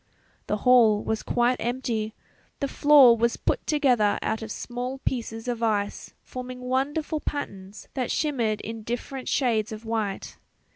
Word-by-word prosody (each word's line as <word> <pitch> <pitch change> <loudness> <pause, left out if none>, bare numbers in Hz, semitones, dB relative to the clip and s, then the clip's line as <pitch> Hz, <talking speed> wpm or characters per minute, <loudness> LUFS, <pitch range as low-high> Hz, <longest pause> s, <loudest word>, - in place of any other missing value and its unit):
The 210 - 0
hall 230 -4 +6
was 220 0 -1
quite 245 +1 +1
empty; 230 -3 -2 0.4
the 280 - 0
floor 275 -4 +7
was 235 +1 +1
put - - -1
together 250 -9 +3
out 220 +1 -1
of 220 -1 -6
small 250 +3 -4
pieces 225 -2 -3
of 240 -2 -2
ice 210 -3 -1
forming 255 0 -7
wonderful 285 +5 -1
patterns 200 -10 -6
that 255 -3 -2
shimmered 235 -9 0
in 225 0 -6
different 245 +4 -5
shades 225 -5 +1
of 220 +1 -8
white. 220 -3 -3
240 Hz, 145 wpm, -26 LUFS, 220-260 Hz, 0.4 s, floor